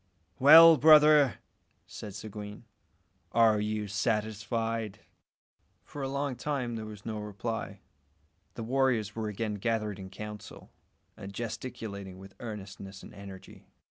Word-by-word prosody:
"Well, 160 +4 +9
brother," 150 -2 +6 0.5
said 100 -2 -9
Seguin, 105 +1 -8 0.7
"are 110 -2 +4
you 105 0 -2
satisfied?" 110 +1 -2 0.8
For 145 - -9
a 135 - -2
long 140 -1 -2
time 125 -2 -3
there 110 -1 -6
was 105 -2 -11
no 110 -2 -4
reply. 105 +2 -5 0.7
The 115 - -5
warriors 120 -4 0
were 110 -1 -3
again 105 +1 -3
gathered 105 -3 -1
in 95 -1 -8
council, 105 +2 -10 0.4
and 95 - -9
gesticulating 100 -4 -6
with 95 0 -13
earnestness 100 -3 -8
and - - -12
energy. 95 -1 -12
110 Hz, 120 wpm, -29 LUFS, 100-120 Hz, 0.8 s, Well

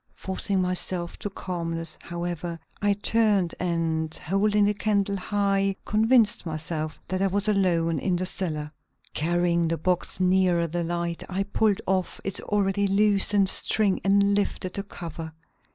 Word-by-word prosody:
Forcing 190 0 -1
myself 180 -1 -2
to 205 - -3
calmness, 165 -4 -4
however, 170 -1 -4 0.2
I 205 0 +3
turned 205 -3 +2
and, 165 -2 -1
holding 205 +4 +2
the 205 - +2
candle 200 -1 0
high 195 0 0
convinced 220 0 +3
myself 155 -1 -4
that 185 +1 -2
I 195 - +3
was 200 +2 +1
alone 170 -6 +2
in 185 -2 0
the 180 +1 -1
cellar. 155 -5 -3 0.4
Carrying 170 +1 +1
the 165 +1 -1
box 180 +3 -1
nearer 180 -2 +3
the 170 +1 -2
light, 170 0 -2
I 195 +1 -1
pulled 205 0 +1
off 185 -1 -1
its 195 - -2
already 200 -1 0
loosened 200 0 +4
string 205 -2 +2
and 200 +1 +3
lifted 200 -2 -1
the 200 - -2
cover. 165 -5 -8
185 Hz, 145 wpm, -26 LUFS, 170-200 Hz, 0.4 s, loosened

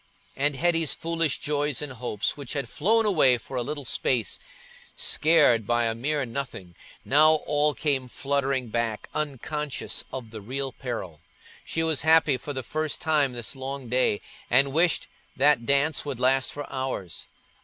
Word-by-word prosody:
And 145 +1 +1
Hetty's 165 +1 +2
foolish 165 -3 -1
joys 145 -2 -1
and 145 -3 -4
hopes, 115 -4 -2
which 140 -4 -6
had 140 -2 -2
flown 220 +8 +2
away 150 -11 +4
for 130 - -9
a 125 - 0
little 145 +2 -5
space, 120 -2 -1 0.6
scared 145 -9 +3
by 120 0 +2
a 115 - 0
mere 140 +4 -1
nothing, 115 -8 -6 0.3
now 155 +3 +6
all 150 0 +2
came 135 -4 0
fluttering 135 -1 -1
back, 115 -1 -2
unconscious 150 0 -3
of 120 -4 -7
the 110 -2 -8
real 135 +5 -4
peril. 110 - -6 0.4
She 165 - -2
was 160 -3 +1
happy 160 -3 +4
for 135 +4 -7
the 130 -2 -4
first 155 +4 -2
time 150 -5 +1
this 120 +2 -4
long 135 -1 -6
day, 125 -4 +1 0.3
and 135 +2 +4
wished 170 +2 +2 0.3
that 135 -3 +3
dance 140 +3 +2
would 140 -4 -5
last 130 +1 +2
for 145 0 -6
hours. 130 -10 -4
140 Hz, 160 wpm, -26 LUFS, 125-150 Hz, 0.6 s, now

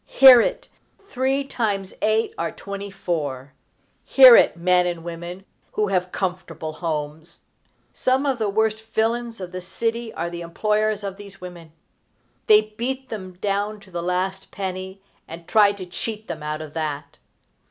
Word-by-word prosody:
Hear 260 -3 +9
it! - - -2 0.4
Three 270 -2 0
times 205 -8 -2
eight 220 +1 +1
are 170 - -2
twenty 200 0 -7
four! 145 -8 -4 0.5
Hear 260 -3 +9
it, - - +5
men 180 +1 +3
and 170 -2 -4
women 175 +2 -7 0.3
who 210 -1 0
have 180 -1 0
comfortable 180 -4 -4
homes! 155 0 -5 0.5
Some 260 +2 +1
of 270 -4 0
the 215 -2 0
worst 220 +1 +1
villains 230 +1 -1
of 180 -2 -7
the 185 0 -6
city 230 +5 -3
are 170 +1 -3
the 170 0 -6
employers 210 +4 0
of 195 -1 -5
these 200 -1 -12
women. 175 -3 -10 0.8
They 215 0 +7 0.2
beat 260 +2 -3
them 190 -5 -6
down 205 +3 -2
to 195 -2 -18
the 170 -1 -3
last 185 +2 -2
penny, 190 0 -6 0.2
and 165 +1 -10
try 210 -2 +5
to 195 -2 -8
cheat 215 +4 -6
them - - -6
out 150 +1 -4
of 150 -1 -11
that. 150 -3 -4
195 Hz, 160 wpm, -23 LUFS, 170-220 Hz, 0.8 s, Hear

